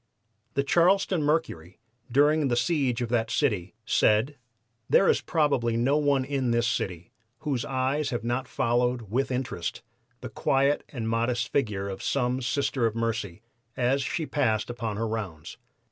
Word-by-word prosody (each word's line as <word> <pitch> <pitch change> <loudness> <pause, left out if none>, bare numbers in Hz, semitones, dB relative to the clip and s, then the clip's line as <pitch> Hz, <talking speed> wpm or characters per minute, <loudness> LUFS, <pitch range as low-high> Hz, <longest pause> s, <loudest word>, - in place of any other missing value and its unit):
The 140 - +2
Charleston 180 +3 +3
Mercury, 145 - -1 0.3
during 145 +3 +4
the 120 - +1
siege 130 -4 +1
of 120 - -4
that 115 -2 0
city, 105 - 0
said: 110 +6 +2 0.5
"There 195 - +5
is - - +3
probably 135 -8 +1
no 130 +5 +2
one 140 -3 +2
in 135 -2 -1
this 120 0 +2
city 95 -9 -3 0.3
whose 140 -6 -1
eyes 135 +3 -1
have 120 - -3
not 120 +2 -2
followed 120 -3 0
with 130 +3 0
interest 125 -10 -3 0.4
the - - -6
quiet 140 +2 +1
and 115 -5 -4
modest 115 +2 0
figure 105 -7 0
of 95 -1 -6
some 125 -1 0
Sister 135 -2 0
of 110 - -4
Mercy 115 -4 -3 0.3
as 130 +2 +2
she 155 +6 -2
passed 110 -7 0
upon 115 -3 -4
her 115 +1 -1
rounds. 95 -9 -5
125 Hz, 155 wpm, -27 LUFS, 115-140 Hz, 0.5 s, There